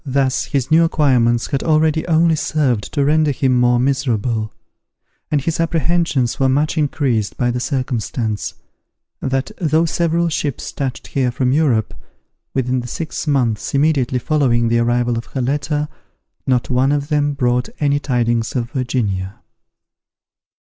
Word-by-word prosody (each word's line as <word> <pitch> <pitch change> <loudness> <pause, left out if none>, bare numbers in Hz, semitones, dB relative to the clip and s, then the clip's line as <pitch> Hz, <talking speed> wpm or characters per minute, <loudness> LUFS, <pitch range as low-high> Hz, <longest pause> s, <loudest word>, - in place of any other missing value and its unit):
Thus 135 -2 0
his 140 0 -2
new 165 +2 +6
acquirements 125 -7 +2
had 135 - 0
already 155 0 +2
only 165 0 +3
served 145 -7 -1
to 140 - +1
render 155 +1 +3
him 130 -2 +1
more 125 0 +3
miserable; 120 -5 0 0.8
and 145 -2 +1
his 165 +4 -2
apprehensions 165 -5 0
were 135 -1 +3
much 145 +5 +1
increased 135 -8 0
by 120 -2 +1
the 125 - -2
circumstance, 120 -4 -2 0.7
that 135 0 -1
though 160 0 +2
several 170 +1 +1
ships 145 -4 -3
touched 135 -3 -4
here 130 -2 0
from 125 +1 0
Europe, 135 -8 +1 0.6
within 130 -1 0
the 125 - -6
six 160 +4 -5
months 125 -5 0
immediately 140 -4 +2
following 120 -3 +1
the 115 0 +2
arrival 120 0 +1
of 115 - -10
her 130 - -4
letter, 145 +3 -1 0.6
not 125 -1 +1
one 130 +2 +2
of 145 0 -1
them 145 -1 +1
brought 125 -1 0
any 145 -1 +2
tidings 120 -4 0
of 120 -2 -2
Virginia. 105 -7 -2
135 Hz, 145 wpm, -18 LUFS, 120-150 Hz, 0.8 s, new